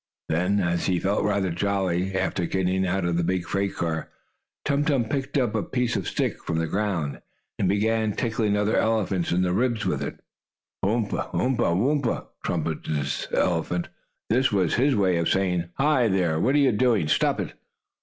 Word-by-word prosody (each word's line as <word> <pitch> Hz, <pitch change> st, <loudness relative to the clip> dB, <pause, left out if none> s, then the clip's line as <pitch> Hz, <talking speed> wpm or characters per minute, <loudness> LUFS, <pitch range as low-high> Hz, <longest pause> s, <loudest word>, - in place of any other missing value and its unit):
Then, 90 Hz, +5 st, +1 dB
as 85 Hz, -2 st, 0 dB
he 90 Hz, -, +2 dB
felt 100 Hz, +3 st, 0 dB
rather 100 Hz, -3 st, +1 dB
jolly, 95 Hz, 0 st, 0 dB
after 90 Hz, -2 st, -1 dB
getting 95 Hz, 0 st, 0 dB
out 95 Hz, 0 st, 0 dB
of 85 Hz, -1 st, 0 dB
the 85 Hz, -, +1 dB
big 90 Hz, +1 st, 0 dB
freight 100 Hz, +2 st, -1 dB
car, 80 Hz, -2 st, -2 dB, 0.6 s
Tum 140 Hz, 0 st, +2 dB
Tum 140 Hz, -6 st, +1 dB
picked 135 Hz, +5 st, -2 dB
up 125 Hz, -5 st, +1 dB
a 110 Hz, -, +1 dB
piece 125 Hz, +2 st, -1 dB
of 95 Hz, -4 st, -2 dB
stick -, -, -2 dB
from 80 Hz, -, -2 dB
the 80 Hz, -, +1 dB
ground, 90 Hz, -5 st, -2 dB, 0.4 s
and 95 Hz, -, +2 dB
began 110 Hz, +1 st, +1 dB
tickling 110 Hz, -3 st, 0 dB
another 105 Hz, +1 st, +1 dB
elephant 100 Hz, -6 st, +1 dB
in 90 Hz, +1 st, +2 dB
the 90 Hz, -1 st, +1 dB
ribs 115 Hz, -1 st, 0 dB
with 75 Hz, -7 st, 0 dB
it. 70 Hz, -, -5 dB, 0.6 s
"Yoump! 105 Hz, +1 st, 0 dB, 0.2 s
Umph! 125 Hz, -2 st, +1 dB
Woomph!" 120 Hz, -, +1 dB, 0.2 s
trumpeted 80 Hz, -2 st, -2 dB
this 70 Hz, -2 st, -2 dB
elephant. 85 Hz, 0 st, 0 dB, 0.4 s
This 130 Hz, +3 st, +3 dB
was 95 Hz, -5 st, +1 dB
his 135 Hz, +3 st, +3 dB
way 95 Hz, -4 st, +2 dB
of 85 Hz, -, +1 dB
saying: 90 Hz, -3 st, +1 dB
"Hi, 135 Hz, -4 st, +3 dB
there! 90 Hz, -6 st, +1 dB
What 130 Hz, -, +2 dB
are -, -, +5 dB
you 140 Hz, -3 st, +4 dB
doing? 110 Hz, -7 st, +2 dB
Stop -, -, +2 dB
it!" -, -, -4 dB
95 Hz, 185 wpm, -25 LUFS, 85-115 Hz, 0.6 s, are